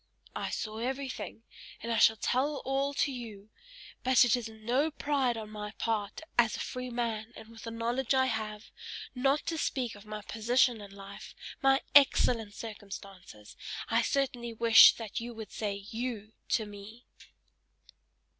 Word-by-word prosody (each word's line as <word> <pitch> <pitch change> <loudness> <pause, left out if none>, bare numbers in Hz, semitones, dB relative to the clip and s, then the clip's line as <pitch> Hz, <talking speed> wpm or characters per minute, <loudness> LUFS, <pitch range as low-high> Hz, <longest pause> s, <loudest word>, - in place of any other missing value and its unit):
"I - - -2
saw 215 0 -4
everything, 260 -2 -4 0.4
and 235 - -3
I 225 - +2
shall 220 - +6
tell 275 +7 0
all 275 +1 +1
to 280 - +1
you: 220 -5 -8 0.5
but 260 -1 +6
it 240 - +4
is 235 -2 -4
no 240 +7 0
pride 280 -5 0
on 215 -1 -7
my 210 0 -6
part 215 0 -2 0.2
as 230 -3 +4
a - - -7
free 255 0 -4
man, 230 -2 -2
and 220 0 -11
with 230 0 -12
the - - -4
knowledge 235 +3 0
I 260 0 +4
have, 215 -3 -4 0.4
not 270 +3 +1
to 325 -1 -2
speak 250 -6 -1
of 205 +1 -14
my 210 0 -6
position 230 +2 +2
in 200 - -9
life, 195 0 -11 0.3
my 270 0 +4
excellent 235 -6 +5
circumstances 195 - -9 0.3
I 230 +1 +3
certainly 245 -3 -1
wish 225 0 +8
that 220 -3 -5
you 235 0 -6
would 220 -2 -8
say 205 -2 -2 0.2
YOU* 225 -2 -4 0.2
to 225 -4 +2
me!" 205 +3 -11
230 Hz, 160 wpm, -31 LUFS, 215-255 Hz, 0.5 s, wish